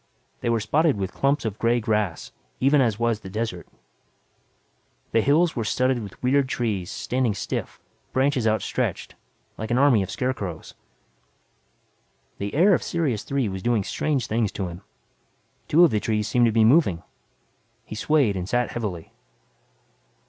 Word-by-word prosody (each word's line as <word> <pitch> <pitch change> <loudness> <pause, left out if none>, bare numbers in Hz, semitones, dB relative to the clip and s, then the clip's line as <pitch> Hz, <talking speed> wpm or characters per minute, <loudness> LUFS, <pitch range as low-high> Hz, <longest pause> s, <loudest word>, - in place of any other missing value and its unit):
They - - -2
were 115 -1 +2
spotted 140 +6 +2
with 95 -1 -3
clumps 140 -1 0
of 110 -2 -4
gray 120 +1 +2
grass 105 -6 -1 0.3
even 140 +2 +4
as 115 -5 +1
was 115 -2 0
the 95 - -10
desert. 105 -3 -4 1.4
The 115 - +3
hills 160 +7 +3
were 115 - -1
studded 130 +3 +1
with 100 +2 -10
weird 135 +1 +2
trees 105 -8 -2
standing 125 -4 -1
stiff, - - -4 0.3
branches 130 -3 +1
outstretched, 110 -2 -1 0.5
like 110 - -4
an 120 - +1
army 130 -6 +5
of 95 - -4
scarecrows. 100 -11 -4 1.7
The 100 +4 -4
air 190 +6 +5
of - - +2
Sirius 145 -11 -1
Three 135 -4 -1
was 95 -1 -5
doing 115 -1 +1
strange 135 +3 -1
things 110 -3 0
to 95 -3 -3
him. 85 +2 -9 0.9
Two 165 +4 +5
of 170 - +5
the 105 - +1
trees 105 -1 -1
seemed 120 -1 +3
to - - +2
be 110 0 +4
moving. 110 - +3 0.8
He - - -9
swayed 125 -1 +2
and 90 0 -4
sat 120 0 0
heavily. 100 -8 -5
115 Hz, 155 wpm, -24 LUFS, 105-130 Hz, 1.7 s, army